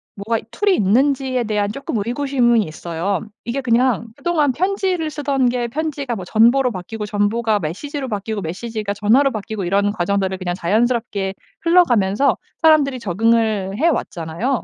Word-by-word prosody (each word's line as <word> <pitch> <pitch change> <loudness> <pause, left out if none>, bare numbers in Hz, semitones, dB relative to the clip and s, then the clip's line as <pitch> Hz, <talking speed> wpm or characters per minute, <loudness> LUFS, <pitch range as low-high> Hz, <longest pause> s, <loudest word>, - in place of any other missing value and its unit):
뭐가 220 +3 -2
툴이 405 +4 +1
있는지에 255 - +2
대한 210 -2 -1
쪼끔 260 -2 -4
의구심은 240 -2 +2
있어요. 170 +4 -3 0.2
이게 240 +4 -3
그냥 240 -1 +2
그동안 310 -5 +1
편지를 370 -1 0
쓰던 275 -4 +1
게 240 -1 -1
편지가 280 -1 -3
뭐 190 - -6
전보로 240 +6 +4
바뀌고 210 +3 -6
전보가 210 +1 0
메시지로 265 - -4
바뀌고 210 -1 -3
메시지가 205 +4 -4
전화로 235 +8 +3
바뀌고 215 -3 -4
이런 200 +3 +1
과정들을 190 -1 -1
그냥 175 -2 -3
자연스럽게 210 0 0 0.3
흘러가면서 270 - +3 0.2
사람들이 290 -5 +4
적응을 215 -1 +1
해왔잖아요. 235 - -1
230 Hz, 375 characters per minute, -20 LUFS, 200-275 Hz, 0.3 s, 전보로